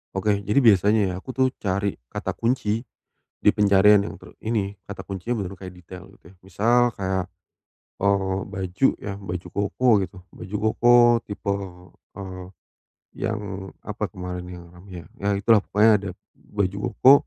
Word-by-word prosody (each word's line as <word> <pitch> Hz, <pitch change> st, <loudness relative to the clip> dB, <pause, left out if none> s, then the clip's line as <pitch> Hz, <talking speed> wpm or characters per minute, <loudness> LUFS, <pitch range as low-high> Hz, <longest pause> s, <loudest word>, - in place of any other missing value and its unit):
Oke, 100 Hz, +1 st, +1 dB
jadi, 105 Hz, +7 st, +4 dB
biasanya, 105 Hz, 0 st, +5 dB
ya, -, -, -5 dB
aku, 130 Hz, -, -16 dB
tuh, 130 Hz, 0 st, +3 dB
cari 100 Hz, 0 st, 0 dB, 0.2 s
kata -, -, -4 dB
kunci 115 Hz, -2 st, 0 dB, 0.7 s
di -, -, +7 dB
pencarian 100 Hz, 0 st, +5 dB
yang -, -, -9 dB
ter -, -, -15 dB
ini, 105 Hz, -3 st, -1 dB, 0.2 s
kata 100 Hz, -, -7 dB
kuncinya 100 Hz, +5 st, -3 dB
bener-bener 95 Hz, -2 st, -5 dB
kayak 90 Hz, -, -11 dB
detail, 90 Hz, +1 st, -11 dB
gitu, -, -, -41 dB
ya. -, -, -22 dB
Misal, 110 Hz, +6 st, +2 dB, 0.2 s
kayak, 95 Hz, -1 st, -1 dB, 0.8 s
eee, 95 Hz, -1 st, +1 dB
baju, 95 Hz, +5 st, 0 dB
ya, 105 Hz, -, -6 dB
baju 90 Hz, -2 st, -5 dB
koko, 105 Hz, +5 st, 0 dB
gitu. 95 Hz, 0 st, -5 dB, 0.2 s
Baju 100 Hz, +3 st, -6 dB, 0.2 s
koko 120 Hz, 0 st, +5 dB, 0.3 s
tipe, 100 Hz, -1 st, -2 dB, 0.6 s
eee, 95 Hz, -2 st, -7 dB, 0.7 s
yang 105 Hz, -1 st, -3 dB, 0.4 s
apa -, -, -3 dB
kemarin 90 Hz, -1 st, -6 dB
yang 90 Hz, -1 st, -9 dB
ramai, 90 Hz, -1 st, -11 dB
ya. -, -, -19 dB
Ya, 100 Hz, -, -1 dB
itulah. 105 Hz, +2 st, +4 dB
Pokoknya, 105 Hz, +3 st, +3 dB
ada 100 Hz, -1 st, -6 dB, 0.3 s
baju 100 Hz, -1 st, -2 dB, 0.2 s
koko, 130 Hz, -, +7 dB
100 Hz, 155 wpm, -24 LUFS, 95-105 Hz, 0.8 s, di